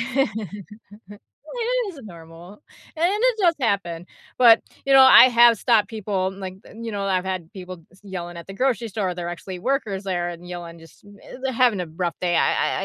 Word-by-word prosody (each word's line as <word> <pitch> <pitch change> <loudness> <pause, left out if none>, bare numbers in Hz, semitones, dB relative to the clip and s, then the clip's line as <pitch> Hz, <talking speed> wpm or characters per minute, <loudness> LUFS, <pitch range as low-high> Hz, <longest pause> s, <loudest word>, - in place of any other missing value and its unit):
it 210 - -3 1.2
is 285 - -12
normal, 170 - -13 0.3
and 335 +2 +2
it 470 +2 +1
does 345 -5 +3
happen, 180 -7 -2 0.3
but, 235 -3 +6 0.2
you 275 - +3
know, 270 - +9
I 260 - +9
have 235 -3 +5
stopped 220 -5 +2
people, 195 -3 -2
like, 185 -1 -6
the - - -16
you 230 - -5
know, 200 -1 -4
I've 190 -1 -1
had 185 -1 -5
people 185 -4 -10
s 190 - -22
yelling 175 -3 -7
at 170 - -10
the 195 - -9
grocery 245 -1 -1
store, 190 -3 -3
they're 175 -1 -5
actually 180 +1 -7
workers 210 -4 -2
there 175 -2 -2
and 175 +1 -11
yelling 170 -1 -8
just 165 +7 -18 0.2
eh, - - -11
they're 265 -1 -1
having 235 -5 +2
a - - -6
rough 170 +2 -4
day, 175 -2 +1
I - - 0
195 Hz, 190 wpm, -22 LUFS, 175-230 Hz, 1.2 s, know